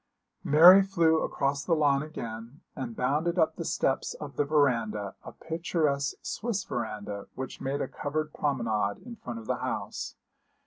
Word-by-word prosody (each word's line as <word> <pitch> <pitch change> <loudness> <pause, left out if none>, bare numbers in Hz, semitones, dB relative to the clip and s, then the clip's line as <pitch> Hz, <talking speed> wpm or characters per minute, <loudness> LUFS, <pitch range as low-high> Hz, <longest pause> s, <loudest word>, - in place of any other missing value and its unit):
Mary 175 +6 +9
flew 170 -5 +2
across 140 0 -1
the 170 - +2
lawn 145 -3 +3
again, 120 -2 -7
and 125 -5 -5
bounded 150 +9 0
up 160 -2 +3
the 170 - -4
steps 135 -4 0
of 145 -2 -8
the - - +2
verandah 115 -9 +1
a - - -8
picturesque 155 -4 -1
Swiss 220 -4 -2
verandah 105 -4 -5
which 130 0 -6
made 140 +2 -2
a - - -1
covered 155 +1 -3
promenade 115 -8 0
in 240 -1 -8
front 120 - -7
of 115 - -8
the - - -1
house. - - -4
140 Hz, 160 wpm, -28 LUFS, 120-160 Hz, -, Mary